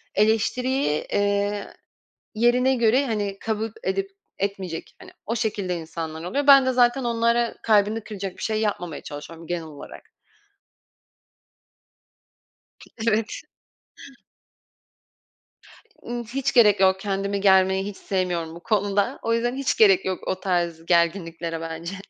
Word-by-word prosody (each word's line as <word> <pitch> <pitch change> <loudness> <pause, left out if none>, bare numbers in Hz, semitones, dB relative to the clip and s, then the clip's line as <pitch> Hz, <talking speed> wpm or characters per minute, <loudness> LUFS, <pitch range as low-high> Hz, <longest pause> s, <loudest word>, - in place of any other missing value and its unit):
eleştiriyi, 225 - +1
eee, 205 0 0 0.7
yerine 250 +3 +3
göre 240 +3 +3
hani 205 -4 -2
kabul 220 0 -2
edip 195 +1 -2 0.3
etmeyecek, 190 -4 -4
hani, 370 0 -13
o 230 - -2
şekilde 205 -5 -2
insanlar 160 -1 -6
oluyor. 280 +11 -2
Ben 275 -1 +8
de 260 - +2
zaten 245 +1 +3
onlara 235 0 +1
kalbini 215 0 +3
kıracak 195 -3 -6
bir - - -7
şey 220 0 -1
yapmamaya 180 -7 -3
çalışıyorum 160 +3 -9
genel 175 -1 -3
olarak. 155 -3 -11 2.8
Bi 220 - -10
evet. 220 0 -1 2.6
Imm, 240 0 -4
hiç 265 +4 -2
gerek 210 -6 +6
yok 190 0 +4
kendimi 200 0 -2
germeyi 190 0 +4
hiç 205 -1 -6
sevmiyorum 175 -4 -2
bu 170 - -9
konuda. 205 -2 0
O 230 - 0
yüzden 240 +2 0
hiç 275 -1 -1
gerek 195 -3 +5
yok 190 -1 -3
o 185 - -1
tarz 175 -3 -1
gerginliklere 170 -1 0
bence. 165 +3 -6
200 Hz, 125 wpm, -24 LUFS, 180-230 Hz, 2.8 s, Ben